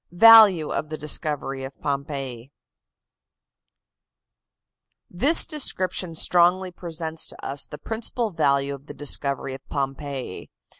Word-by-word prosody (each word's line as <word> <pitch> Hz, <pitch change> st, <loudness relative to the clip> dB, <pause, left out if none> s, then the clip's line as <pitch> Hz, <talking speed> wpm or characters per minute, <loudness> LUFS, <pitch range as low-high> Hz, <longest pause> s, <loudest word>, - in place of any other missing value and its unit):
VALUE 205 Hz, -4 st, +7 dB
OF 155 Hz, -, -3 dB
THE 155 Hz, -, -5 dB
DISCOVERY 145 Hz, -3 st, -3 dB
OF 135 Hz, +1 st, -9 dB
POMPEII 140 Hz, -4 st, -5 dB, 2.6 s
This 275 Hz, -, +4 dB
description 185 Hz, -, -1 dB
strongly 180 Hz, +3 st, +2 dB
presents 165 Hz, -2 st, -5 dB
to -, -, -10 dB
us 140 Hz, +1 st, 0 dB
the 150 Hz, -, -9 dB
principal 225 Hz, +2 st, -4 dB
value 140 Hz, -4 st, +1 dB
of 140 Hz, +1 st, -12 dB
the -, -, -10 dB
discovery 140 Hz, -2 st, -1 dB
of 135 Hz, -, -9 dB
Pompeii. 135 Hz, -5 st, -5 dB
155 Hz, 110 wpm, -23 LUFS, 140-180 Hz, 2.6 s, VALUE